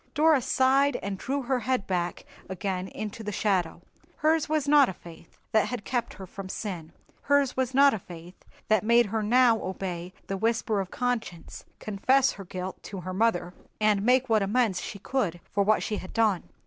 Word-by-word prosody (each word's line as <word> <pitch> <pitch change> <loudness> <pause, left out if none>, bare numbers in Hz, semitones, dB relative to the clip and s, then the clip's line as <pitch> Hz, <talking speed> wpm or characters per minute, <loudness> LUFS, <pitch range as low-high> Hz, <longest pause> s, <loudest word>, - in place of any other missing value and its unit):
Dora 305 -2 +4
sighed 270 +2 +3
and 200 0 -3
drew 275 +1 -2
her 255 +1 0
head 245 -2 -1
back 175 -2 -2 0.2
again 190 0 -3
into 215 +2 -6
the 210 - -4
shadow. 180 -5 -1 0.3
Hers 315 0 +2
was 305 -2 0
not 285 -2 +6
a - - -4
faith 165 -1 -15
that 220 - +3
had 245 -5 -5
kept 240 -3 -2
her 190 - -9
from 190 +1 -9
sin—hers 215 - -2
was 260 0 -1
not 280 0 +6
a 220 - -2
faith 175 0 -12 0.2
that 215 -2 +3
made 235 +2 +5
her 220 +2 -2
now 235 +1 +4
obey 180 -2 -5
the 195 - -3
whisper 225 0 0
of 190 - -6
conscience, 230 -9 -4
confess 255 +6 +2
her 195 - -10
fault 185 +1 -6
to 195 -3 -7
her 185 +1 -5
mother, 185 -4 0 0.3
and 210 -2 +3
make 250 +4 +3
what 220 -3 +3
amends 205 -1 +1
she - - -6
could 200 -5 -2
for 200 - +1
what 210 +2 +2
she 215 - -2
had 185 - -9
done. 215 -6 +1
215 Hz, 185 wpm, -27 LUFS, 190-255 Hz, 0.3 s, not